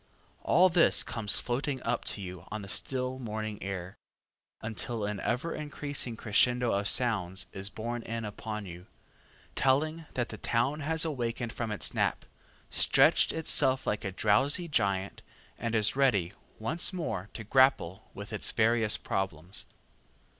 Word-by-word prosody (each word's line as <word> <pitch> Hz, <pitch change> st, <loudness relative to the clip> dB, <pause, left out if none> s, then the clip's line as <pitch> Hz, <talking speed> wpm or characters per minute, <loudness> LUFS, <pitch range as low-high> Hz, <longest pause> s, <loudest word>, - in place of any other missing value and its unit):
All 180 Hz, +2 st, +5 dB
this 170 Hz, -1 st, +4 dB
comes 110 Hz, -3 st, +1 dB
floating 130 Hz, +2 st, -2 dB
up -, -, -1 dB
to 100 Hz, -, -1 dB
you 90 Hz, -1 st, -7 dB
on 110 Hz, -1 st, -5 dB
the -, -, -8 dB
still 130 Hz, +5 st, -1 dB
morning 110 Hz, -3 st, -4 dB
air, 95 Hz, -1 st, -5 dB, 0.7 s
until 110 Hz, 0 st, -3 dB
an 105 Hz, -1 st, -3 dB
ever 150 Hz, +12 st, -1 dB
increasing 145 Hz, -5 st, -3 dB
crescendo 120 Hz, +3 st, +2 dB
of 100 Hz, +1 st, 0 dB
sounds 95 Hz, -8 st, +1 dB
is 95 Hz, +1 st, -3 dB
borne 115 Hz, +4 st, -4 dB
in 115 Hz, 0 st, -4 dB
upon 105 Hz, 0 st, -5 dB
you, 90 Hz, 0 st, -10 dB, 0.7 s
telling 155 Hz, +5 st, +1 dB
that 120 Hz, -1 st, -1 dB
the 110 Hz, -, -8 dB
town 135 Hz, +6 st, 0 dB
has 160 Hz, +2 st, 0 dB
awakened 120 Hz, -5 st, -2 dB
from 115 Hz, -2 st, -3 dB
its 105 Hz, -, -1 dB
nap, -, -, 0 dB, 0.5 s
stretched -, -, +4 dB
itself 135 Hz, -4 st, +3 dB
like 105 Hz, -, -1 dB
a 95 Hz, -, -2 dB
drowsy 130 Hz, -, +2 dB
giant, 100 Hz, -, 0 dB, 0.4 s
and 115 Hz, -1 st, -1 dB
is 105 Hz, +1 st, +3 dB
ready 105 Hz, -10 st, +2 dB, 0.2 s
once 150 Hz, -, -1 dB
more 155 Hz, -, -3 dB
to 115 Hz, -, -5 dB
grapple 110 Hz, -6 st, +3 dB
with 100 Hz, +2 st, -8 dB
its 105 Hz, -, -1 dB
various 110 Hz, -1 st, +3 dB
problems. 90 Hz, -2 st, -3 dB
115 Hz, 145 wpm, -30 LUFS, 100-130 Hz, 0.7 s, All